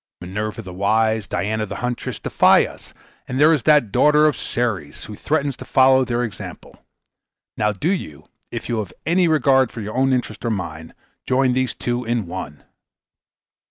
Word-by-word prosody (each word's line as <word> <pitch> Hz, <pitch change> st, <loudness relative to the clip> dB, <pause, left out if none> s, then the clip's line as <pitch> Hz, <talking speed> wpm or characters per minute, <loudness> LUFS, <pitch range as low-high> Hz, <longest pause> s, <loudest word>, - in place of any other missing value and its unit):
Minerva 105 Hz, +5 st, -5 dB
the 95 Hz, -2 st, -9 dB
wise, 110 Hz, +3 st, +1 dB
and -, -, -25 dB
Diana 110 Hz, +2 st, -2 dB
the 100 Hz, -, -6 dB
huntress, 120 Hz, +4 st, -4 dB
defy -, -, +4 dB
us; -, -, -12 dB, 0.4 s
and 130 Hz, +1 st, -3 dB
there 155 Hz, +2 st, +6 dB
is 150 Hz, -, +1 dB
that 145 Hz, -9 st, +4 dB
daughter 150 Hz, +7 st, +4 dB
of 150 Hz, -4 st, +3 dB
Ceres, 110 Hz, -14 st, -3 dB
who 105 Hz, -, -8 dB
threatens 140 Hz, +2 st, -1 dB
to -, -, -8 dB
follow 130 Hz, 0 st, +4 dB
their 120 Hz, -1 st, -1 dB
example. 110 Hz, -6 st, -8 dB, 0.7 s
Now 105 Hz, 0 st, +1 dB
do 125 Hz, -, -1 dB
you, 80 Hz, -, -5 dB, 0.2 s
if -, -, -6 dB
you 115 Hz, -2 st, -1 dB
have 100 Hz, -5 st, -5 dB
any 175 Hz, +2 st, +3 dB
regard 135 Hz, -4 st, +3 dB
for -, -, -9 dB
your 105 Hz, 0 st, -5 dB
own 135 Hz, +1 st, +2 dB
interest 125 Hz, -4 st, -2 dB
or 120 Hz, -, -1 dB
mine, 80 Hz, -6 st, -5 dB, 0.3 s
join 130 Hz, 0 st, +2 dB
these 130 Hz, -2 st, -1 dB
two 120 Hz, 0 st, -2 dB
in 115 Hz, -2 st, -1 dB
one." 75 Hz, -3 st, -7 dB
120 Hz, 180 wpm, -21 LUFS, 105-130 Hz, 0.7 s, there